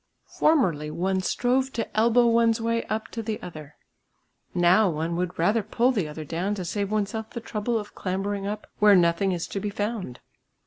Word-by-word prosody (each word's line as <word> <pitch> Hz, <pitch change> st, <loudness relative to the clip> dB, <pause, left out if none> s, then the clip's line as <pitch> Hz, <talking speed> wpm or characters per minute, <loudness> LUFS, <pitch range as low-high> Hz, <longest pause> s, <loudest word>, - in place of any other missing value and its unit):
Formerly 180 Hz, -, +3 dB
one 185 Hz, +4 st, -1 dB
strove 255 Hz, +7 st, +1 dB
to 230 Hz, -, -4 dB
elbow 235 Hz, +2 st, +4 dB
one's 230 Hz, 0 st, +3 dB
way 230 Hz, 0 st, 0 dB
up 215 Hz, +1 st, -3 dB
to 230 Hz, -, -5 dB
the 220 Hz, -1 st, -3 dB
other; 155 Hz, -4 st, -9 dB, 0.8 s
now 180 Hz, +4 st, +4 dB
one 165 Hz, +1 st, -2 dB
would 180 Hz, 0 st, -2 dB
rather 205 Hz, +7 st, +2 dB
pull 240 Hz, +5 st, +1 dB
the 200 Hz, -11 st, -1 dB
other 150 Hz, +1 st, -7 dB
down 180 Hz, +7 st, -2 dB
to 185 Hz, -3 st, -5 dB
save 200 Hz, +3 st, -2 dB
oneself 215 Hz, +1 st, -2 dB
the 235 Hz, -, -6 dB
trouble 225 Hz, +1 st, -2 dB
of 210 Hz, -1 st, -6 dB
clambering 195 Hz, +1 st, -3 dB
up 210 Hz, +1 st, -4 dB
where 210 Hz, -1 st, +7 dB
nothing 175 Hz, +2 st, +3 dB
is 175 Hz, -2 st, -2 dB
to 200 Hz, -, -3 dB
be 210 Hz, -, -3 dB
found. 205 Hz, -, -4 dB
205 Hz, 185 wpm, -25 LUFS, 175-225 Hz, 0.8 s, where